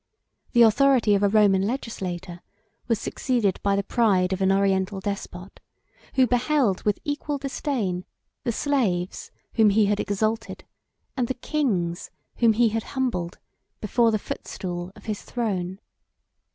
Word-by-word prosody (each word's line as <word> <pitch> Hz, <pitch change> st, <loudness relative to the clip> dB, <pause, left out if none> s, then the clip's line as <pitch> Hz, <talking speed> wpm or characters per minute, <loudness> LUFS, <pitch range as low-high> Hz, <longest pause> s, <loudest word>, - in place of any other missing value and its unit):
The 240 Hz, -2 st, +7 dB
authority 235 Hz, -1 st, +4 dB
of 200 Hz, -, +2 dB
a 205 Hz, -, +4 dB
Roman 205 Hz, -2 st, +4 dB
legislator, 190 Hz, -6 st, -4 dB, 0.5 s
was 230 Hz, -2 st, +2 dB
succeeded 235 Hz, -8 st, 0 dB
by 200 Hz, 0 st, +2 dB
the 200 Hz, -, 0 dB
pride 195 Hz, -5 st, +2 dB
of 190 Hz, -, -3 dB
an 190 Hz, 0 st, +3 dB
Oriental 195 Hz, 0 st, +1 dB
despot, 195 Hz, -2 st, -6 dB, 0.6 s
who 260 Hz, -, +5 dB
beheld, 250 Hz, -4 st, +1 dB
with 210 Hz, -1 st, +1 dB
equal 290 Hz, 0 st, -2 dB
disdain, 260 Hz, -, -2 dB, 0.4 s
the 245 Hz, -, 0 dB
slaves 215 Hz, -10 st, -1 dB, 0.2 s
whom 220 Hz, -2 st, +5 dB
he 210 Hz, +1 st, +4 dB
had 205 Hz, 0 st, +1 dB
exalted, 215 Hz, +2 st, -2 dB, 0.5 s
and 250 Hz, -3 st, 0 dB
the 260 Hz, -, -2 dB
kings 200 Hz, -, -1 dB, 0.3 s
whom 230 Hz, -2 st, +4 dB
he 230 Hz, +1 st, +3 dB
had 225 Hz, +1 st, -1 dB, 0.2 s
humbled 180 Hz, -10 st, -1 dB, 0.4 s
before 230 Hz, +2 st, +2 dB
the 220 Hz, -, +2 dB
footstool 175 Hz, -3 st, -6 dB
of -, -, -16 dB
his 215 Hz, -2 st, -3 dB
throne. 190 Hz, -6 st, -3 dB
210 Hz, 140 wpm, -25 LUFS, 190-240 Hz, 0.6 s, The